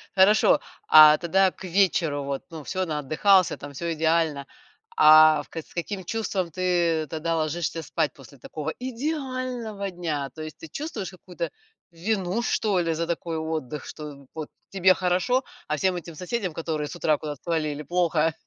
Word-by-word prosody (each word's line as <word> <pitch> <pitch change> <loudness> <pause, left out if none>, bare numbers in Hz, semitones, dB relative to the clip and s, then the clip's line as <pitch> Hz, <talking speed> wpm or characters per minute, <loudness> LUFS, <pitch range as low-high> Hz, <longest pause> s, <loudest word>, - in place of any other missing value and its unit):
Хорошо. 200 +3 +5 0.3
А 155 0 +9
тогда 190 +2 +2
к - - -14
вечеру 170 -6 +1
вот, 140 -1 -4
ну, 160 -3 -8
всё 185 +3 -2
наотдыхался 160 +5 +3
там, 145 0 -9
всё 170 +4 -3
идеально. 160 -3 +1 0.5
А 155 0 +7
в - - -23
к - - -11
с - - -21
каким 190 +2 -4
чувством 195 -3 -2
ты 170 -2 +1
тогда 165 +1 -2
ложишься 165 +1 -2
спать 155 -3 -1
после 135 0 -15
такого 155 +3 -5
идеального 255 -5 -3
дня? 155 -6 -3
То 155 - -8
есть, 155 0 -7
ты - - -6
чувствуешь 260 - -5
какую-то 180 -2 -6 0.4
вину 190 +4 -1
что 205 -6 +1
ли 165 -1 0
за 165 +1 -1
такой 170 -1 -3
отдых, 155 -3 -4
что 145 -3 -9
вот 155 -2 -5 0.2
тебе 190 -1 +4
хорошо, 185 +9 +1 0.2
а 150 - 0
всем 185 +4 +1
этим 170 -2 -7
соседям, 185 +1 -3
которые 155 -2 -3
с - - -8
утра 155 -2 +1
куда-то 150 -2 -7
свалили, 155 -3 -2
плохо? 165 -1 +1
170 Hz, 165 wpm, -25 LUFS, 155-190 Hz, 0.5 s, А